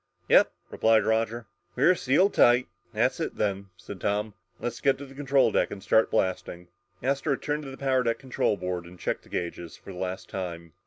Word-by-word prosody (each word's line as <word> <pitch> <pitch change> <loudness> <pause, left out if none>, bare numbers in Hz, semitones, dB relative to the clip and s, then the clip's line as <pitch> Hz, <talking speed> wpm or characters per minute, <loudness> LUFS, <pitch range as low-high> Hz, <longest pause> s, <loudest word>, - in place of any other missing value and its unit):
"Yep," - - +6 0.2
replied 110 0 +3
Roger. 115 +1 0 0.3
"We're 140 +8 +5
sealed 180 +5 +2
tight." 120 +1 +5 0.2
"That's - - +1
it, - - -3
then," 100 -1 -1
said 100 0 -10
Tom. 105 +1 -1 0.3
"Let's 120 -1 -4
get 135 -2 +3
to 140 - -8
the 135 - -13
control 140 -1 +2
deck - - +1
and 95 - -8
start 110 - +3
blasting!" 90 -1 -2 0.3
Astro 140 +2 +1
turned 150 +2 -3
to - - -6
the 135 - -9
power 130 -2 +1
deck 115 -2 0
control 125 -5 -1
board 90 -2 -4
and 90 +1 -13
checked - - -2
the - - -21
gauges 85 -1 -5
for 95 - -11
the 90 - -9
last 95 0 -4
time. 85 -3 -6
110 Hz, 200 wpm, -27 LUFS, 95-135 Hz, 0.3 s, Yep